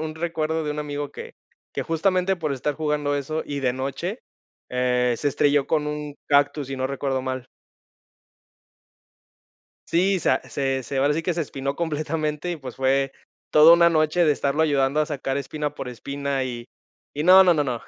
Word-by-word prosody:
un 155 Hz, 0 st, -4 dB
recuerdo 160 Hz, -1 st, -2 dB
de 150 Hz, -, -2 dB
un 150 Hz, -, -6 dB
amigo, 145 Hz, -1 st, -4 dB
que -, -, -9 dB, 0.4 s
que, -, -, -2 dB
justamente, 185 Hz, +3 st, +1 dB
por 155 Hz, -4 st, -2 dB
estar 140 Hz, +2 st, -2 dB
jugando 150 Hz, -1 st, -1 dB
eso, 155 Hz, +3 st, -3 dB
y 145 Hz, -1 st, -4 dB
de 130 Hz, -2 st, +1 dB
noche, 140 Hz, -, -4 dB, 0.5 s
eh, 125 Hz, -1 st, +1 dB
se 145 Hz, -, 0 dB
estrelló 145 Hz, 0 st, +2 dB
con 150 Hz, -2 st, 0 dB
un 150 Hz, -1 st, -5 dB
cactus, 145 Hz, 0 st, +2 dB
si 135 Hz, +1 st, -5 dB
no 130 Hz, 0 st, -1 dB
recuerdo 135 Hz, -1 st, -2 dB
mal. 130 Hz, -1 st, -4 dB, 2.4 s
Sí, 185 Hz, +2 st, +2 dB
sa -, -, +2 dB
se 135 Hz, -1 st, -1 dB
se, 135 Hz, +2 st, -4 dB
ahora 140 Hz, +2 st, +3 dB
sí 160 Hz, +2 st, -1 dB
que 175 Hz, 0 st, -1 dB
se 170 Hz, -, -2 dB
espinó 140 Hz, -2 st, -3 dB
completamente, 155 Hz, 0 st, -2 dB
y 170 Hz, -, -4 dB
pues, 130 Hz, -4 st, -9 dB
fue 135 Hz, +1 st, +1 dB, 0.4 s
toda 155 Hz, +2 st, +8 dB
una 170 Hz, 0 st, +5 dB
noche 155 Hz, +2 st, +2 dB
de 155 Hz, -, +4 dB
estarlo 145 Hz, +2 st, 0 dB
ayudando 140 Hz, -1 st, +2 dB
a 150 Hz, -, +1 dB
sacar 135 Hz, -2 st, -3 dB
espina 145 Hz, +2 st, -3 dB
por 135 Hz, -, -6 dB
espina, 140 Hz, +2 st, -3 dB
y 120 Hz, -2 st, -6 dB, 0.5 s
y 150 Hz, +1 st, -2 dB
no, 190 Hz, +2 st, +8 dB
no, 180 Hz, -, +6 dB
no, 155 Hz, -3 st, +1 dB
no. 125 Hz, -4 st, -3 dB
145 Hz, 185 wpm, -24 LUFS, 135-160 Hz, 2.4 s, toda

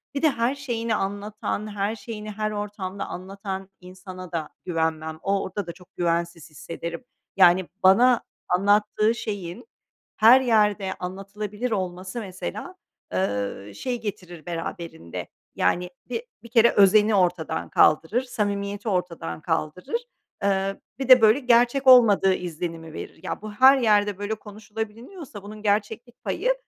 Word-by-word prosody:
Bir 280 Hz, -, -1 dB
de 315 Hz, -, +5 dB
her 245 Hz, 0 st, 0 dB
şeyini 230 Hz, -5 st, -2 dB
anlatan, 205 Hz, +2 st, -3 dB
her 205 Hz, +2 st, -1 dB
şeyini 215 Hz, -2 st, -7 dB
her 215 Hz, +1 st, -2 dB
ortamda 205 Hz, -2 st, -5 dB
anlatan 195 Hz, +1 st, -6 dB
insana 185 Hz, 0 st, -10 dB
da 160 Hz, -3 st, -3 dB, 0.2 s
güvenmem. 160 Hz, -2 st, -2 dB
O 195 Hz, 0 st, +1 dB
orada 195 Hz, 0 st, -5 dB
da 170 Hz, -, -4 dB
çok 180 Hz, 0 st, -19 dB
güvensiz 170 Hz, -1 st, -1 dB
hissederim. 170 Hz, -, -7 dB, 0.3 s
Yani 180 Hz, -1 st, +6 dB, 0.2 s
bana 240 Hz, +6 st, +6 dB, 0.3 s
anlattığı 210 Hz, +4 st, +3 dB
şeyin 195 Hz, -, -5 dB, 0.5 s
her 235 Hz, +5 st, +8 dB
yerde 210 Hz, -5 st, +2 dB
anlatılabilir 205 Hz, +5 st, -5 dB
olması 185 Hz, +2 st, -3 dB
mesela, 185 Hz, -, -6 dB, 0.4 s
eee, 100 Hz, +1 st, -2 dB
şey 245 Hz, -, -3 dB
getirir 180 Hz, -6 st, -7 dB
beraberinde. 165 Hz, -, -6 dB, 0.3 s
Yani 180 Hz, 0 st, +1 dB, 0.2 s
bi 465 Hz, -, -3 dB, 0.2 s
bir 235 Hz, -, -12 dB
kere 235 Hz, 0 st, +5 dB
özeni 210 Hz, +2 st, +5 dB
ortadan 175 Hz, -, 0 dB
kaldırır, 165 Hz, +11 st, +3 dB
samimiyeti 205 Hz, -3 st, -3 dB
ortadan 170 Hz, -, -3 dB
kaldırır, 180 Hz, -, -2 dB, 0.4 s
eee, 195 Hz, 0 st, 0 dB, 0.2 s
bir 265 Hz, -1 st, -3 dB
de 255 Hz, -2 st, +9 dB
böyle 220 Hz, +4 st, +6 dB
gerçek 245 Hz, +1 st, +3 dB
olmadığı 215 Hz, -7 st, +7 dB
izlenimi 165 Hz, -2 st, -5 dB
verir. -, -, -8 dB
Ya -, -, -4 dB
bu 215 Hz, 0 st, -7 dB
her 260 Hz, +6 st, +7 dB
yerde 210 Hz, -5 st, +3 dB
böyle 205 Hz, +2 st, -3 dB
konuşulabiliniyorsa 220 Hz, -, -8 dB
bunun 210 Hz, +1 st, -10 dB
gerçeklik 215 Hz, +3 st, -2 dB
payı, -, -, 0 dB
200 Hz, 135 wpm, -24 LUFS, 180-220 Hz, 0.5 s, de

